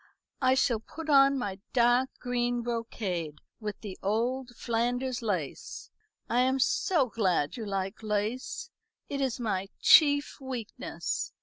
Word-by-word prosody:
I 260 0 +4
shall 240 -4 +2
put 310 +7 -6
on 275 0 +6
my 200 -6 -3
dark 245 +1 +4
green 245 -1 -1
brocade 210 -9 -3 0.2
with 210 -2 -5
the 200 -4 -7
old 240 +6 0
Flanders 245 +2 -1
lace. 185 - -4 0.4
I 240 - +1
am 260 +1 +3
so 290 +3 +2
glad 185 -10 0
you 225 -3 -5
like 195 +1 -3
lace. 215 +3 -2 0.4
It 280 -1 -2
is 265 -2 -1
my 195 -5 -1
chief 285 -2 +5
weakness. 255 -5 -4
240 Hz, 130 wpm, -29 LUFS, 210-260 Hz, 0.4 s, on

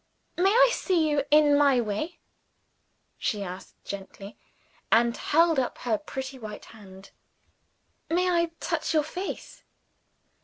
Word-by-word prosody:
"May 370 +3 +3
I - - +5
see 345 -5 +1
you, 290 -2 0
in 300 -1 +5
my 280 -3 +4
way?" 240 +10 -3 1.0
she 210 -4 -2
asked 185 0 -10
gently 200 +1 -8 0.6
and 235 +1 +4
held 325 -1 +3
up 255 - -2
her 230 -3 -1
pretty 265 -2 -7
white 215 -2 -8
hand. 195 -3 -14 1.0
"May 360 +2 +1
I 340 -1 +3
touch - - -2
your 305 - +4
face?" 360 +6 -7
280 Hz, 125 wpm, -26 LUFS, 215-330 Hz, 1.0 s, I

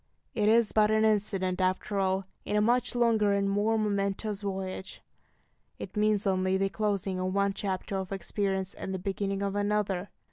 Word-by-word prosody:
It 210 -2 +2
is 230 0 +4
but 210 -1 +4
an 220 0 +3
incident, 195 -3 +1
after 185 +2 0
all, 190 0 0 0.2
in - - -2
a - - +4
much 245 +3 +2
longer 225 -4 +3
and 200 0 +1
more 205 +3 +1
momentous 200 0 -1
voyage. 190 -1 -5 0.7
It - - -8
means 210 -1 +2
only 185 -1 +1
the 195 0 +1
closing 195 -2 -1
of 185 +1 -2
one 200 0 +2
chapter 195 0 -3
of 190 0 -4
experience 195 -1 -2
and 190 - -5
the - - -1
beginning 195 +1 -2
of 200 0 -2
another. 205 -2 0
200 Hz, 175 wpm, -29 LUFS, 190-210 Hz, 0.7 s, is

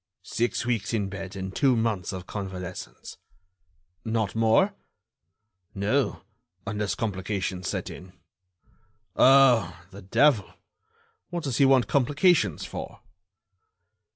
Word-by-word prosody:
"Six 120 0 -1
weeks 115 -1 -1
in 100 -3 -1
bed 95 -1 -7
and 95 0 -6
two 135 -4 +3
months 110 -6 -1
of 95 -2 -7
convalescence." 95 -3 -7 0.9
"Not 110 -3 -1
more?" 115 - +3 1.0
"No, 105 +7 0 0.4
unless 105 -2 -2
complications 95 -3 -3
set - - -4
in." 90 0 -11 1.0
"Oh! 125 -10 +5
the 100 +2 -11
devil! 110 +2 +2 0.7
what 175 -2 -4
does 135 -4 -2
he 140 - +5
want 130 -2 +4
complications 145 +6 +2
for?" - - -8
110 Hz, 105 wpm, -26 LUFS, 95-130 Hz, 1.0 s, Oh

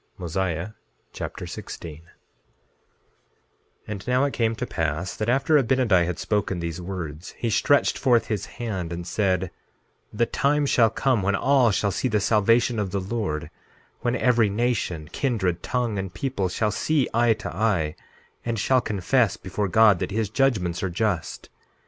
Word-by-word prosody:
Mosiah 90 +1 -2 0.4
Chapter - - -6
16 80 -3 -8
16:1 - - -17 1.9
And 100 -1 -6
now, 125 +2 +3
it 140 - 0
came 115 -1 +1
to - - -3
pass 80 +2 -2
that 110 +2 -2
after 140 +4 +4
Abinadi 115 -9 +2
had 90 - -3
spoken 100 -4 -1
these 85 0 -4
words 85 -3 -6
he 115 - -1
stretched 145 +6 +3
forth 120 -4 +3
his 105 -2 -3
hand 100 -8 -4
and 85 0 -5
said: 95 -1 0 0.6
The 120 +3 +1
time 145 +4 +1
shall 115 -4 +4
come 125 -1 +1
when 100 +1 +1
all 130 +2 +4
shall 100 0 +1
see 130 - -1
the 105 -3 +1
salvation 115 +3 +3
of 100 -2 -1
the 100 +2 -2
Lord; 95 -6 -3 0.5
when 120 0 0
every 120 -4 +3
nation, 105 -8 -1
kindred, 95 -10 -1
tongue, 120 -5 -1
and 95 -1 -4
people 100 -1 -2
shall 105 +4 0
see 150 +1 +1
eye 115 0 +4
to 110 -5 -7
eye 95 -7 +1 0.5
and 115 -1 -2
shall 130 +5 +3
confess 105 +1 +1
before 100 +1 -3
God 105 0 +5
that - - -2
his 105 0 -2
judgments 105 -11 +1
are 95 - -1
just. 90 -2 -2
105 Hz, 160 wpm, -24 LUFS, 90-120 Hz, 1.9 s, God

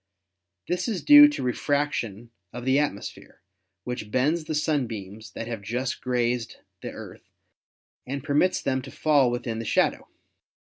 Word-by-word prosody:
This 180 0 -1
is 210 -6 -3
due 295 0 +10
to 295 - -3
refraction 125 -4 -2 0.2
of 125 +1 -7
the 130 +2 +3
atmosphere, 145 -9 -4 0.4
which 125 -3 -5
bends 150 +8 +1
the 155 - -3
sunbeams 110 -9 -2
that 115 - -5
have 115 -2 -5
just 125 +6 -3
grazed 120 -2 -1 0.3
the - - -5
Earth - - -11 0.8
and 135 +1 -4
permits 150 +6 +1
them 130 -1 0
to 135 - -10
fall 145 -3 +3
within 120 -2 -3
the - - -4
shadow. - - +1
130 Hz, 145 wpm, -25 LUFS, 115-150 Hz, 0.8 s, due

